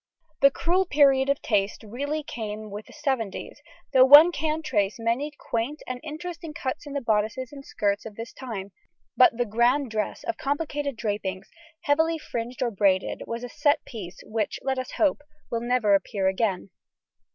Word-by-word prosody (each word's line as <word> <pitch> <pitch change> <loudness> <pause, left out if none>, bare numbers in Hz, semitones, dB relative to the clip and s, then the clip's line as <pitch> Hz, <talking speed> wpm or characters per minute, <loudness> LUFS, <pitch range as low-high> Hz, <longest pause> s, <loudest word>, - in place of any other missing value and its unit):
The 275 - +8
cruel 350 +6 +1
period 275 -3 +4
of 280 - 0
taste 205 -1 0
really 285 +8 -3
came 215 -6 -6
with 210 +1 -7
the - - -14
seventies, 265 -9 -3 0.3
though 260 -1 +8
one 290 +6 +10
can 315 -1 -2
trace 210 -9 0
many 235 +6 0
quaint 240 +7 -3
and 255 0 -5
interesting 325 +1 -7
cuts 265 +2 -4
in 285 - -7
the 280 - -2
bodices 225 +2 0
and 275 -1 -9
skirts 200 -5 -1
of 210 - -11
this 230 +2 -7
time; 205 -7 -6 0.4
but 340 -11 +6
the 245 - +1
"grand 240 +4 +2
dress" 215 -2 -2
of 345 - -3
complicated 285 -1 -2
drapings, 205 -4 -3 0.3
heavily 320 +1 +2
fringed 245 -4 -4
or 240 - 0
braided, 195 -2 +1
was 230 +1 -4
a - - -4
"set 295 +1 +1
piece" 190 -6 -8
which, 215 -2 -2
let 265 -1 0
us 255 - -6
hope, 295 -2 +2 0.3
will 230 - -1
never 240 -4 +2
appear 195 0 +1
again. 190 0 0
250 Hz, 175 wpm, -26 LUFS, 215-290 Hz, 0.4 s, one